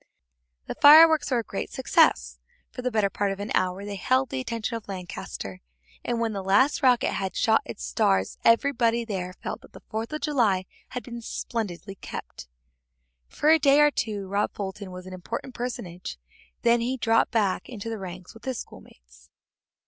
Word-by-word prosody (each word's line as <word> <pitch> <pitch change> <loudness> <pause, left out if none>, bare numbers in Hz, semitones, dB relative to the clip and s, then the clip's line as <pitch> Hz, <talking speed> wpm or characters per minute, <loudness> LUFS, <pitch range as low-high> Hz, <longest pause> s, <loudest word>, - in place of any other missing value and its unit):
The - - -4
fireworks 315 +2 +8
were 255 - +2
a 235 - 0
great - - -5
success; 65 -2 +2 0.3
for - - -7
the 250 - 0
better 215 -4 +2
part 200 -1 -1
of 195 - -5
an 205 +1 -5
hour 185 +2 0
they 205 -1 -5
held 255 +6 +1
the 270 - -2
attention 230 -2 -3
of 225 - -7
Lancaster, 175 - -7 0.4
and 240 -1 -1
when 230 -1 -1
the 200 - -3
last 200 +9 +3
rocket 250 -3 +3
had 190 -1 -3
shot 220 -2 +3
out - - -20
its 115 - -7
stars 95 +10 +1
every 230 +5 +4
boy 235 -2 +1
there 185 -4 -4
felt - - -4
that - - -18
the - - -11
Fourth 220 +3 -3
of 305 - -4
July 230 -11 +1 0.2
had 250 - -5
been 235 -1 -8
splendidly 205 -4 -4
kept. 180 - -9 0.8
For 300 - 0
a 320 - +6
day 280 0 +5
or 295 0 +6
two 210 -7 -3
Rob 200 +2 0
Fulton 195 0 -5
was 180 0 -9
an 185 - -9
important 230 +8 -6
personage, 180 - -6 0.5
then 235 0 +4
he 255 +3 -1
dropped 225 -2 +2
back 205 -5 0
into 230 -3 -7
the 225 -1 -4
ranks 185 -1 -8
with 225 - -15
his 260 -2 -2
schoolmates. 60 - -13
220 Hz, 190 wpm, -26 LUFS, 185-245 Hz, 0.8 s, fireworks